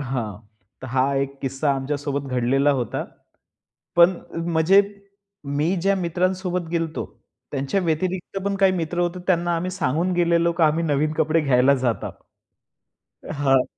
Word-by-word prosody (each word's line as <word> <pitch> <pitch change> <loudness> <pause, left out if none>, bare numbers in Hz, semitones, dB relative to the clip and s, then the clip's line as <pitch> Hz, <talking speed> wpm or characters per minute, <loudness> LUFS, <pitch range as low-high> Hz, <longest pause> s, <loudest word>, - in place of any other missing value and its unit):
हां, 120 -7 -4 0.4
तर 130 - -7
हा 130 +2 +1
एक 140 0 -2
किस्सा 135 +2 0
आमच्या 135 +2 -2
सोबत 140 -1 -3
घडलेला 130 +3 +2
होता. 120 - -3 0.9
पण 175 +2 +6 0.4
म्हणजे 165 +5 +5 0.8
मी 160 +5 +2
ज्या 200 +1 +3
मित्रांसोबत 180 0 -1
गेलो 165 -1 0
होतो 160 - -5 0.5
त्यांच्या 140 +7 -1
व्यतिरिक्त 180 +3 -2
पण 200 0 0
काही 195 -1 +4
मित्र 175 -1 -3
होते 175 +1 -1
त्यांना 175 -2 +2
आम्ही 180 +2 -2
सांगून 175 0 0
गेलेलो 170 -1 +2
की 170 0 -1
आम्ही 160 +2 +3
नवीन 150 0 +1
कपडे 160 +1 +2
घ्यायला 135 -2 +4
जातात. 125 -4 -2 1.2
हां. 135 -3 +3
160 Hz, 145 wpm, -23 LUFS, 135-175 Hz, 1.2 s, पण